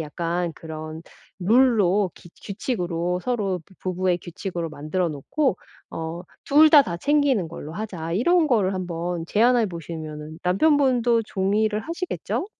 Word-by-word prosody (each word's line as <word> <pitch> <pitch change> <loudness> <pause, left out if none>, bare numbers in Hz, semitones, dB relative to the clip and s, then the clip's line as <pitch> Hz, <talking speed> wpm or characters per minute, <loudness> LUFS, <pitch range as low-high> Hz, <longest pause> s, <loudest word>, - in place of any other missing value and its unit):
약간 170 +2 -2
그런 155 0 -8 0.4
룰로 205 -2 +3
기 175 - -15
규칙으로 180 -5 -2
서로 200 -5 -1 0.2
부부의 185 -1 0
규칙으로 175 -1 -5
만들어 155 +5 -2
놓고 190 - -1 0.3
어 165 +1 -5 0.2
"2 305 +2 +6
다 295 -2 +9
다 170 -10 -4
챙기는 280 - +2
걸로 155 -1 -8
하자." 175 -5 -5
이런 335 - +3
거를 210 -9 +2
한번 175 -2 -3
제안해 235 +4 +3
보시면은 160 -3 -7
남편분도 245 - +3
종이를 210 +2 0
하시겠죠? 340 - -3
185 Hz, 280 characters per minute, -24 LUFS, 170-235 Hz, 0.4 s, 다